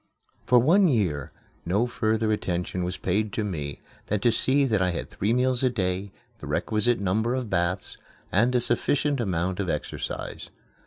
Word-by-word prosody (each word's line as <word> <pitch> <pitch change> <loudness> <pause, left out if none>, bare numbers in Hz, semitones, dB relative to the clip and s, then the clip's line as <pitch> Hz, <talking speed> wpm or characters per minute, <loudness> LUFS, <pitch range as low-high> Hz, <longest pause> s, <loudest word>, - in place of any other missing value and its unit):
For 125 - +6
one 175 - +5
year 90 - 0 0.3
no 100 +7 +1
further 110 -2 0
attention 90 -3 -2
was 90 +1 -3
paid 100 +4 0
to 115 -3 -1
me 75 -8 -4 0.3
than 105 - 0
to 120 - +4
see 135 +4 +3
that 110 -7 +1
I 90 - +2
had 85 - -4
three 105 +3 -1
meals 125 0 +2
a 130 - +3
day, 95 -3 -2 0.3
the - - -8
requisite 115 +2 +1
number 110 +6 0
of 125 -4 -4
baths, 90 +1 -1 0.3
and 120 +6 +3
a 125 - +3
sufficient 140 +4 +1
amount 95 -3 -1
of 95 -3 -1
exercise. 75 - -4
105 Hz, 170 wpm, -26 LUFS, 90-120 Hz, 0.3 s, For